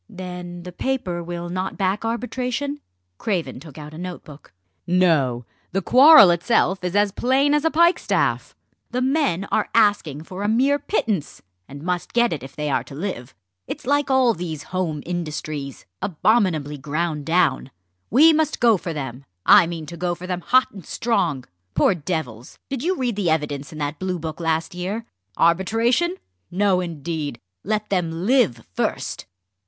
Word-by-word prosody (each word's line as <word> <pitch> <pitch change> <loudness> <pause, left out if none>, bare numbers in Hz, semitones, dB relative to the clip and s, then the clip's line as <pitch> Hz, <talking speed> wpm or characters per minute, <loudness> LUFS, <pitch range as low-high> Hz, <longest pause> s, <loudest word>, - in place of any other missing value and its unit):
"Then 180 -3 -7
the 180 - -8
paper 180 -5 -2
will 175 0 -5
not 185 +2 -3
back 195 +2 0
arbitration?" 250 +4 -2 0.4
Craven 170 - -2
took 150 -1 -13
out 150 0 -9
a 155 - -9
note 180 -1 -6
book. 150 -1 -14 0.4
"No! 155 -10 +2 0.3
The 195 0 0
quarrel 255 - +8
itself 190 +1 +1
is 180 +1 -2
as 205 0 +3
plain 270 +7 +2
as 295 +1 +1
a - - +5
pikestaff. 340 +3 +1 0.3
The 250 +1 -1
men 265 - +1
are - - +1
asking 205 -10 +2
for 185 +3 -8
a 205 - 0
mere 270 +6 +3
pittance, 210 - -2 0.2
and 140 +2 -10
must 180 0 -3
get 240 0 +3
it 150 - -5
if 135 +1 -11
they 150 0 -3
are - - +1
to 135 - -11
live. 145 -7 -5 0.3
It's - - -6
like 285 +2 +1
all 260 -3 +4
these 160 -5 -5
home 165 -6 -2
industries, 155 -5 -5 0.2
abominably 170 -6 +1
ground 150 +1 -2
down. 165 -6 +2 0.4
We 310 +8 +6
must 310 -1 0
go 230 -4 +5
for 170 -1 -5
them! 135 -2 -6 0.2
I 170 - +7
mean 165 -2 -5
to 170 +3 -9
go 175 0 -1
for 180 +1 -9
them 180 -1 -3
hot 255 +7 +3
and 195 -3 -11
strong. 150 - -1 0.3
Poor - - +4
devils! 145 -9 -5
did 270 -3 -2
you 365 +6 0
read 245 -4 -1
the 195 -4 0
evidence 150 -3 -1
in 155 - -9
that 145 0 -3
Bluebook 175 -4 -4
last 165 +2 -1
year? 195 +6 -4 0.3
Arbitration? 225 - +2 0.3
no, 190 0 +2
indeed! 155 -5 -4 0.2
let 215 +1 -2
them 175 -2 -1
live 225 - +2
first!" - - -3
180 Hz, 165 wpm, -22 LUFS, 155-230 Hz, 0.4 s, quarrel